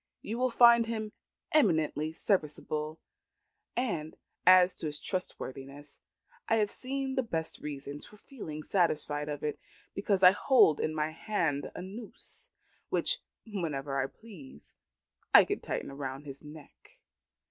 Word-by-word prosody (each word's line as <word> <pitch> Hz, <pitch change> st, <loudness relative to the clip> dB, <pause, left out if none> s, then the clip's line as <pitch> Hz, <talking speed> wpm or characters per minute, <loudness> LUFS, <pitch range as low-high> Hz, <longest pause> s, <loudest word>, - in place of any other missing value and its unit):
You 225 Hz, +3 st, -4 dB
will 255 Hz, 0 st, +2 dB
find 235 Hz, -1 st, +6 dB
him 220 Hz, -2 st, -3 dB, 0.4 s
eminently 160 Hz, -, +2 dB
serviceable; 155 Hz, -3 st, -1 dB, 0.8 s
and 175 Hz, -11 st, -2 dB, 0.3 s
as 185 Hz, 0 st, +8 dB
to 160 Hz, -, -4 dB
his 150 Hz, 0 st, -4 dB
trustworthiness, 145 Hz, -5 st, -6 dB, 0.5 s
I 225 Hz, -, +4 dB
have 210 Hz, -2 st, +2 dB
the 265 Hz, 0 st, -3 dB
best 160 Hz, -1 st, -3 dB
reasons 145 Hz, 0 st, -7 dB
for 210 Hz, -, -16 dB
feeling 160 Hz, -, -8 dB
satisfied 150 Hz, -5 st, 0 dB
of 145 Hz, -1 st, -5 dB
it, 150 Hz, -1 st, -2 dB, 0.3 s
because 200 Hz, -1 st, 0 dB
I 180 Hz, -, +10 dB
hold 205 Hz, -, +4 dB
in 155 Hz, -, -1 dB
my 155 Hz, 0 st, 0 dB
hand 165 Hz, -5 st, -1 dB
a -, -, -5 dB
noose, 220 Hz, -, -11 dB, 0.4 s
which, -, -, +1 dB, 0.3 s
whenever 145 Hz, -, -2 dB
I 135 Hz, -, -1 dB
please, 155 Hz, -, -14 dB, 0.6 s
I -, -, +10 dB
can -, -, -2 dB
tighten -, -, -4 dB
round 135 Hz, 0 st, -5 dB
his 140 Hz, -1 st, -9 dB
neck. 150 Hz, -1 st, -14 dB
160 Hz, 135 wpm, -30 LUFS, 150-215 Hz, 0.8 s, I